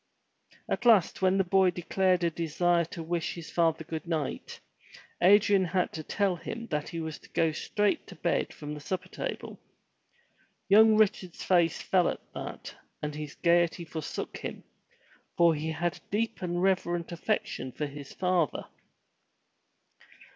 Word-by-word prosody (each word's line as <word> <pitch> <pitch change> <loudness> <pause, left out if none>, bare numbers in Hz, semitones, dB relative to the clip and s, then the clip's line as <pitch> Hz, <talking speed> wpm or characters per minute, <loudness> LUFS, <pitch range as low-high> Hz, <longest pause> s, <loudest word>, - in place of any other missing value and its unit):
At - - -2
last 220 -8 +4
when 190 0 +3
the 195 - +3
boy 190 0 +4
declared 180 +1 +1
a 170 - +2
desire 170 +1 +1
to 165 0 -7
wish 170 0 -2
his 170 -2 -9
father 165 -2 +1
good 160 +1 -6
night, 155 -5 -3 0.6
Adrian 200 0 +5
had 180 +1 0
to 160 - -4
tell 195 +4 0
him 230 +7 -6
that 150 -1 -2
he 170 - -5
was 160 -1 -5
to - - -18
go 165 -1 +1
straight 205 +6 -1
to - - -11
bed - - 0
from 150 0 -7
the 150 - -6
supper 185 +4 -4
table. - - -5 1.1
Young 215 +2 +7
Richard's 190 -4 +1
face 170 -3 +2
fell 180 -2 +3
at - - -7
that - - -7 0.3
and 150 0 -2
his 150 -1 -7
gaiety 170 0 +2
forsook 155 -2 -5
him, - - -7 0.7
for 170 -1 +6
he 155 +1 -3
had 170 +2 -2
a - - -19
deep 220 +3 -1
and 175 0 -1
reverent 175 -3 0
affection 170 - -2
for 150 - -3
his 140 -1 -9
father. 180 -5 0
175 Hz, 155 wpm, -29 LUFS, 160-190 Hz, 1.1 s, Young